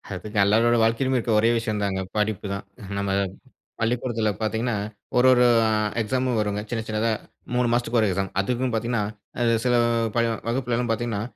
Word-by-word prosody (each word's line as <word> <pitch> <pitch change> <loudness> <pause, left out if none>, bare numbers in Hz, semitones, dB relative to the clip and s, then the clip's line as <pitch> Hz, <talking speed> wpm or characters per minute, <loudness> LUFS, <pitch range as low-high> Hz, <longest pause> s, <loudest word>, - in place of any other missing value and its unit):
அதுங்க 105 +3 -7
எல்லாரோட 115 +3 +4
வாழ்க்கையிலும் 130 +4 +1
இருக்க 115 -1 -1
ஒரே 115 +2 +3
விஷயம் 110 -3 -2
தாங்க. 95 -1 -1 0.2
படிப்பு 105 -1 -1
தான். 100 - -5 0.3
நம்ம 100 0 -1 0.7
பள்ளிக்கூடத்துல 115 -1 0
பார்த்தீங்கன்னா, 110 +1 -1 0.4
ஒரு 125 - +5
ஒரு 125 -1 +5 0.2
அ - - +1 0.3
எக்ஸாமும் 125 +1 0
வருங்க. 105 -1 -1
சின்ன 115 -2 -2
சின்னதா 110 +1 0 0.4
3 125 -1 +2
மாசத்துக்கு 120 -1 +1
ஒரு 110 - +3
எக்ஸாம். 95 0 -2
அதுக்கும் 125 +4 -1
பார்த்தீங்கன்னா, 115 -1 0 0.4
அது 115 -1 +3
சில 125 - +3 0.4
பல 115 - +3 0.2
வகுப்பிலலாம் 120 0 -1
பார்த்தீங்கன்னா, 115 -2 -2
115 Hz, 160 wpm, -24 LUFS, 105-120 Hz, 0.7 s, ஒரு